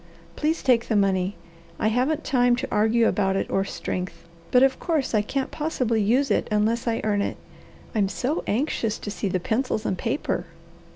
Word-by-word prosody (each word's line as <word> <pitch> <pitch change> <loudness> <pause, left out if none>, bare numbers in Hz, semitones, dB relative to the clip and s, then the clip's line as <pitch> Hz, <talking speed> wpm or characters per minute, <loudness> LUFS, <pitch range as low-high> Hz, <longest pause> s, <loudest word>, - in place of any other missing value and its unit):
Please 315 +2 0
take 245 -3 +3
the 220 - 0
money. 195 -1 +2 0.4
I 215 - +1
haven't 255 +7 0
time 245 -2 +3
to 240 - -3
argue 220 +2 +3
about 195 -2 +1
it - - -1
or 195 - +2
strength, 180 -2 -5 0.2
but 250 +1 +5
of 270 0 +3
course 315 -8 -1
I 215 - +4
can't 265 +5 -3
possibly 255 -8 0
use 250 +7 +2
it - - +1
unless 225 +3 +1
I 230 -1 0
earn 205 -2 +1
it. - - -2 0.6
I'm 205 -3 +1
so 255 - -2
anxious 225 -2 0
to 205 - -6
see 205 - -3
the 185 -1 0
pencils 220 +2 -1
and 190 - 0
paper." 230 +9 -2
225 Hz, 185 wpm, -25 LUFS, 205-255 Hz, 0.6 s, but